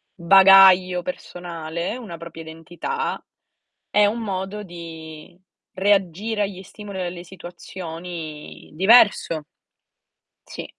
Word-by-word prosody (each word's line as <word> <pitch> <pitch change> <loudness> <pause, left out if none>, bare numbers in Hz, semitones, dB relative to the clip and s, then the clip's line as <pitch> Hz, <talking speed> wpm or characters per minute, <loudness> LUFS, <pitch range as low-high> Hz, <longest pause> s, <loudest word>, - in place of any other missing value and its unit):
bagaglio 190 0 +6
personale, 170 +1 -6
una 200 -9 -9
propria 165 0 -10
identità, 175 - -5 0.7
e 210 0 +4
un 230 +3 -2
modo 195 0 -4
di 165 -2 -11 0.4
reagire 200 +2 0
agli 195 -2 -4
stimoli 200 0 -10
o 180 - -2
alle 175 0 -7
situazioni 170 -3 -9
diverso. 190 -5 +4 1.0
Sì. - - -8
180 Hz, 95 wpm, -22 LUFS, 170-195 Hz, 1.0 s, bagaglio